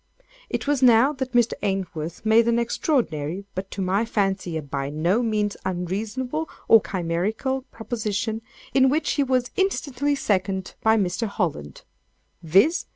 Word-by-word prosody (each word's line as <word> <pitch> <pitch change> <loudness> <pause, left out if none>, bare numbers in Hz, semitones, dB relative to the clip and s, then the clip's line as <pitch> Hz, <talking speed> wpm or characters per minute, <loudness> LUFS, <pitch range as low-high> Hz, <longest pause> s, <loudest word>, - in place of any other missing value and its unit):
It - - -2
was 285 -2 +1
now 250 +3 +6
that 260 -2 -5
Mr. 240 -1 +3
Ainsworth 180 -3 -3
made 225 +1 +5
an 235 0 +3
extraordinary, 200 - -1
but 190 +1 -5
to 195 - -4
my 190 +4 +1
fancy, 195 -6 -1
a - - -3
by 140 -1 -3
no 170 +9 +1
means 210 -3 0
unreasonable 215 - -3 0.2
or 225 - +7
chimerical 195 +10 -2
proposition, 220 -1 -3 0.3
in 265 -1 +5
which 300 +3 +1
he 285 - +2
was 255 -2 0
instantly 290 -7 0
seconded 190 -6 -1
by 220 0 +4
Mr. 195 +3 0
Holland—viz. 180 - -1
215 Hz, 140 wpm, -24 LUFS, 185-250 Hz, 0.3 s, or